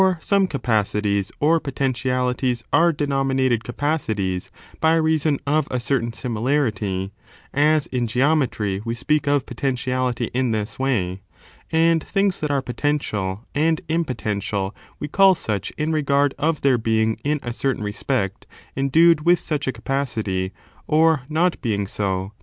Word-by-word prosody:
227 185 -4 +1
some 200 -1 +3
capacities, 105 - 0
or 160 +3 +3
potentialities, 125 -3 -1
are 170 +1 +5
denominated 135 -5 0
capacities 110 - -2 0.3
by 160 +1 +4
reason 155 -2 +2
of 150 +1 +1
a 125 - -1
certain 120 -2 0
similarity 110 -6 -1 0.4
(as 150 +1 +3
in 125 -2 -2
geometry 125 -6 +1
we 115 0 -3
speak 150 +4 0
of 145 -2 +2
potentiality 125 -1 -2
in 130 0 +1
this 110 +1 -3
way), 100 -9 -1 0.5
and 165 0 +3
things 195 -2 0
that 150 - -2
are 140 -2 0
potential 120 -6 -2
and 160 +2 +1
impotential 110 - -2 0.3
we 150 - -3
call 195 +4 +5
such 105 - -3
in 155 +1 -1
regard 140 -2 +2
of 155 +1 0
their 130 -3 +3
being, 110 0 +1
in 150 +1 0
a 120 - -4
certain 130 -3 -1
respect, 105 -1 -2 0.3
endued 150 +4 +4
with 175 +1 +4
such 145 -3 -3
a - - +2
capacity, 115 -7 -2 0.4
or 160 -1 +4
not 165 +3 +1
being 105 -4 -1
so. 95 -1 -2
130 Hz, 140 wpm, -22 LUFS, 110-150 Hz, 0.5 s, are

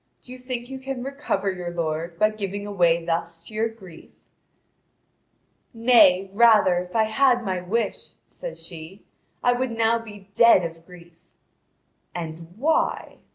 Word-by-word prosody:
Do 250 - -13
you 255 - -9
think 250 -1 -5
you 265 0 -7
can 265 -2 -5
recover 270 -8 -2
your 180 -2 -6
lord 165 0 -3
by 215 +3 +3
giving 205 -1 -5
away 170 -4 +1
thus 165 0 -3
to 215 - -13
your 220 +2 0
grief?" 190 -7 -14 1.7
"Nay, 210 -5 +5
rather, 210 -5 +5
if 180 +2 -8
I 220 - +4
had 245 +2 +2
my 185 -2 -2
wish," 220 +6 -3
says - - -9
she, 170 +3 -11 0.4
"I 245 - +4
would 255 +1 -1
now 230 0 +1
be 205 -3 -13
dead 230 -5 +6
of 165 0 -7
grief." 175 -2 -15 1.0
"And 165 -1 -7
why?" 315 +6 0
205 Hz, 150 wpm, -24 LUFS, 175-235 Hz, 1.7 s, dead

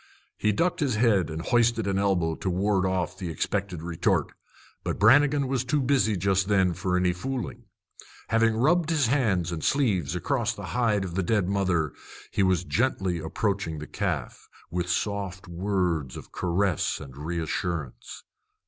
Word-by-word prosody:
He 105 - +1
ducked 170 - 0
his 140 -7 +1
head 105 -7 +3
and 80 +1 -5
hoisted 115 -2 +2
an 100 -1 0
elbow 90 -5 +1
to 95 - -3
ward 95 +1 +1
off 95 -1 -1
the 90 -3 -4
expected 90 +1 -2
retort; 85 -1 0 0.5
but - - -2
Brannigan 140 +5 +5
was 130 -2 0
too 140 +4 0
busy 130 -6 +2
just 95 +1 +1
then 95 -4 +3
for 90 +1 -1
any 90 -1 +2
fooling. 120 +3 -5 0.6
Having 115 0 +3
rubbed 160 +6 +3
his 155 -5 +2
hands 105 - +1
and 80 -2 -4
sleeves 95 - +1
across 90 - -1
the - - -7
hide 115 -5 +2
of 90 - -6
the 95 - 0
dead 95 0 +1
mother, 95 -6 0 0.4
he - - 0
was 95 -2 +2
gently 95 -5 0
approaching 90 +1 -2
the 75 - -6
calf, 85 -9 -4 0.2
with 90 0 -2
soft 100 -1 -2
words 85 -6 -1
of - - -11
caress 90 0 0
and 65 -2 -10
reassurance. 80 -3 -4
95 Hz, 160 wpm, -26 LUFS, 85-115 Hz, 0.6 s, Brannigan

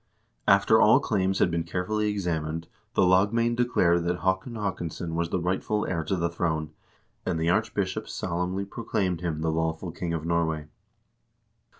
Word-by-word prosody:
After 100 +3 +5
all 110 +5 +7
claims 95 -7 0
had 85 - +3
been 85 0 0
carefully 95 +6 -1
examined, 85 -5 -2 0.3
the - - +4
lagmoend 105 +6 +3
declared 90 -9 +2
that 90 0 -1
Haakon 95 +5 0
Haakonsson 85 -5 -3
was 85 0 -1
the 90 - 0
rightful 95 +4 -1
heir 85 -3 -1
to 95 - 0
the 85 -2 0
throne, 80 -2 -2 0.5
and 80 - -1
the 80 +2 +2
archbishop - - -1
solemnly 90 +3 -2
proclaimed 95 -5 -2
him 80 -3 -2
the 80 0 +1
lawful 80 +2 -2
king 85 0 -4
of 80 -1 -3
Norway. 80 -2 0
90 Hz, 160 wpm, -27 LUFS, 85-100 Hz, 0.5 s, all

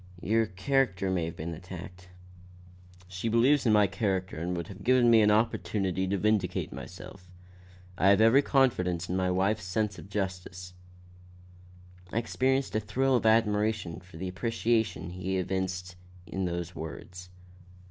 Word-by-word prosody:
Your 110 +2 +2
character 95 -1 0
may 90 -3 0
have 80 - -6
been 85 +2 -5
attacked." 90 +1 -10 1.0
"She 95 +5 -3
believes 125 +4 +3
in - - +4
my 105 -1 +5
character 95 -1 -2
and 85 +3 -3
would 85 -1 -4
have 100 0 -11
given 125 0 +4
me 115 -1 +7
an 105 - +4
opportunity 100 -4 0
to 100 +1 0
vindicate 100 -3 0
myself. 90 -2 -10 0.7
I 95 - +4
have 100 +1 +6
every 115 +5 +6
confidence 90 - +1
in 90 - -1
my 95 -1 +1
wife's 100 +3 +1
sense 105 +2 -2
of - - -12
justice." 90 -2 -4 1.4
I - - -3
experienced 130 +1 0
a - - +3
thrill 130 +5 +1
of 115 -2 +2
admiration 105 -5 +1
for 90 -2 -15
the 95 +3 -4
appreciation 110 0 -1
he 95 +1 -3
evinced 90 -1 -3 0.3
in 95 +2 -3
those 85 0 -3
words. 90 +2 -8
95 Hz, 150 wpm, -29 LUFS, 90-110 Hz, 1.4 s, me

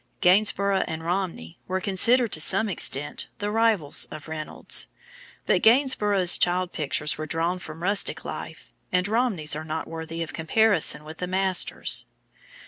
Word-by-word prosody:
Gainsborough 200 +1 +2
and 160 0 -6
Romney 175 - -4
were 185 +1 -2
considered 225 +5 +4
to 155 - +3
some 220 +7 +3
extent 145 -6 +1
the 205 0 -4
rivals 220 -9 +1
of 155 - -11
Reynolds, 155 -1 -1 0.6
but - - +1
Gainsborough's 210 -7 +4
child 180 0 0
pictures 150 0 -1
were 155 - -5
drawn 165 +4 -2
from 160 -1 -10
rustic 200 +2 +2
life, - - -9 0.2
and 180 +1 0
Romney's 210 -10 0
are 155 - -6
not 160 0 -5
worthy 165 0 -6
of 160 - -10
comparison 165 -1 +1
with 155 +1 -11
the 180 - -4
master's. 190 0 +1
180 Hz, 145 wpm, -24 LUFS, 160-205 Hz, 0.6 s, considered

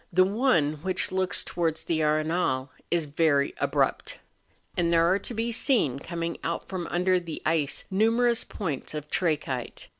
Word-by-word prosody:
The 185 +1 +5
one 185 - +2
which 185 +2 +1
looks 185 +1 +1
towards 165 -2 -1
the 160 -2 0
Arenal 155 -3 +1 0.2
is 170 -2 +1
very 145 -1 +2
abrupt; - - 0 0.6
and 170 -1 +1
there 165 0 +4
are 185 +3 +3
to 240 - -8
be 230 +2 -1
seen 220 - +2
coming 170 +2 -4
out 170 - -3
from 180 -3 -4
under 180 +1 +2
the 165 -3 -7
ice 155 -3 0
numerous 230 +4 +2
points 155 -6 -5
of 150 0 -6
trachyte. 150 -8 -2
170 Hz, 155 wpm, -27 LUFS, 155-190 Hz, 0.6 s, The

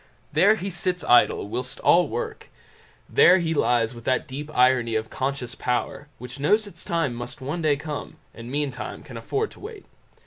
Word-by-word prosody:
There 210 +2 +5
he 195 -1 -5
sits 180 0 -2
idle 120 -4 +4
whilst 125 +5 -4
all 175 -1 +5
work; 120 -1 -5 0.6
there 180 +2 +6
he 165 -3 -1
lies 120 -5 +2
with 115 -1 -11
that 130 +3 0
deep 145 +2 -6
irony 125 -2 +3
of 110 0 -2
conscious 130 -2 -3
power, 125 +3 -2
which 125 +2 -9
knows 210 +10 +3
its 170 -5 -9
time 165 -7 -1
must 120 +2 -7
one 145 +6 -4
day 155 -2 +3
come, 150 +1 -6 0.2
and 115 +1 -9
meantime 145 0 -4
can - - -11
afford 425 +1 -2
to - - -15
wait. 425 -1 -10
140 Hz, 180 wpm, -24 LUFS, 125-170 Hz, 0.6 s, there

